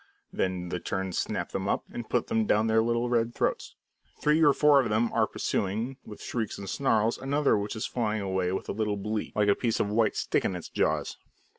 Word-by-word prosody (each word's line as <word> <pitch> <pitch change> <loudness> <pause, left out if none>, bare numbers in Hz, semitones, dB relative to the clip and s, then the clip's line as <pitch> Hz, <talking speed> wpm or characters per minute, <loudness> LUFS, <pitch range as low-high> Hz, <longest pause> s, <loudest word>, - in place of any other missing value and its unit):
Then 90 -1 -2
the 90 - -2
terns 95 0 -2
snap - - -2
them - - -3
up, - - 0
and 120 -2 -6
put - - +1
them 110 -1 0
down 105 +1 +3
their 110 0 +3
little 120 +1 0
red 120 -1 0
throats. - - -1 0.4
Three 150 +2 +3
or 145 - +7
four 145 -1 +5
of 120 - -2
them 110 +2 +1
are - - +3
pursuing, 110 +7 -2
with 105 - -10
shrieks 110 -4 -3
and 100 - -7
snarls, 115 -2 +1
another 140 +2 +2
which 105 +2 -2
is 110 - -3
flying 110 -3 -1
away 95 -2 0
with 95 - -3
a - - -2
little 105 -1 -1
bleak, 105 +2 -3
like 105 -1 +2
a - - +7
piece 115 +1 -1
of 100 - 0
white 110 -1 +2
stick - - 0
in 95 - -1
its 90 - -7
jaws. - - 0
110 Hz, 225 wpm, -28 LUFS, 100-120 Hz, 0.4 s, or